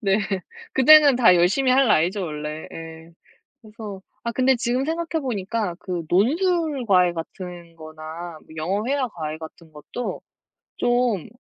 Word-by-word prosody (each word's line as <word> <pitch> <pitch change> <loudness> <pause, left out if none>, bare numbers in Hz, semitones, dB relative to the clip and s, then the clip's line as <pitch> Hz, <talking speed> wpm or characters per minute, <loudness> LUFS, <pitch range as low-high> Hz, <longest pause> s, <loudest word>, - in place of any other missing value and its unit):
네. 195 -2 +2 0.5
그때는 290 +1 +7
다 220 -8 +6
열심히 215 +10 +3
할 270 0 +4
나이죠, 185 +3 +2
원래. 150 0 -6
예. 165 0 -10 0.5
그래서 215 -3 -9 0.2
아, 235 - -2
근데 260 +1 +3
지금 240 +2 -1
생각해 325 0 -2
보니까 210 -5 -2
그 180 -2 -4
논술 300 - +1
과외 180 -3 +4
같은 170 0 -8
거나 160 +1 -9
뭐 - - -25
영어 190 +7 -1
회화 275 -2 0
과외 155 -6 -5
같은 160 0 -12
것도 195 +11 -6 0.6
좀 240 -7 +1
195 Hz, 265 characters per minute, -23 LUFS, 165-255 Hz, 0.6 s, 그때는